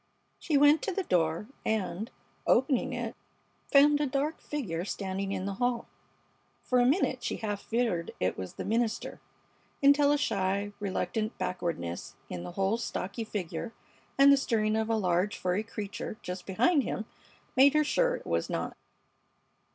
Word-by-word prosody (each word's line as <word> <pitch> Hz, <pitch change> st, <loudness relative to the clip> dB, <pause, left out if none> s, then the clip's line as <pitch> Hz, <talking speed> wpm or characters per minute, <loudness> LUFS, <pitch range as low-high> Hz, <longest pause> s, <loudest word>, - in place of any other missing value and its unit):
She 305 Hz, -4 st, +1 dB
went 290 Hz, +2 st, +6 dB
to 415 Hz, -, -2 dB
the 390 Hz, +1 st, -1 dB
door, 165 Hz, -, +1 dB, 0.2 s
and, 215 Hz, 0 st, -1 dB, 0.4 s
opening 260 Hz, 0 st, +3 dB
it, -, -, -4 dB, 0.6 s
found 290 Hz, +1 st, +6 dB
a 295 Hz, -, +1 dB
dark 285 Hz, +4 st, -1 dB
figure 190 Hz, -, -3 dB
standing 195 Hz, 0 st, -3 dB
in 190 Hz, -1 st, -2 dB
the 200 Hz, -, -2 dB
hall. 245 Hz, -1 st, +1 dB, 0.8 s
For 250 Hz, -, +2 dB
a 245 Hz, -, +4 dB
minute 265 Hz, -4 st, +2 dB
she -, -, -1 dB
half 205 Hz, -2 st, -3 dB
feared 225 Hz, -8 st, -1 dB
it 90 Hz, 0 st, 0 dB
was 95 Hz, -1 st, -6 dB
the -, -, -6 dB
minister, 225 Hz, +1 st, -1 dB, 0.6 s
until 285 Hz, +1 st, +6 dB
a 290 Hz, -, +4 dB
shy, 200 Hz, -5 st, 0 dB
reluctant 205 Hz, +2 st, -2 dB
backwardness 165 Hz, -, -3 dB, 0.2 s
in 90 Hz, -, -4 dB
the 90 Hz, 0 st, -7 dB
whole 195 Hz, +4 st, +1 dB
stocky 200 Hz, -1 st, -3 dB
figure 205 Hz, +1 st, -4 dB, 0.4 s
and 280 Hz, +1 st, +8 dB
the -, -, +5 dB
stirring 215 Hz, -5 st, +1 dB
of 220 Hz, 0 st, 0 dB
a 225 Hz, -, +2 dB
large 185 Hz, 0 st, +1 dB
furry 185 Hz, +2 st, 0 dB
creature 215 Hz, -1 st, -6 dB
just 180 Hz, 0 st, -6 dB
behind 285 Hz, -, +3 dB
him 220 Hz, -, -3 dB, 0.5 s
made 275 Hz, +3 st, +6 dB
her 305 Hz, -, +5 dB
sure -, -, +2 dB
it -, -, -9 dB
was -, -, -1 dB
not. -, -, -3 dB
220 Hz, 160 wpm, -30 LUFS, 185-275 Hz, 0.8 s, and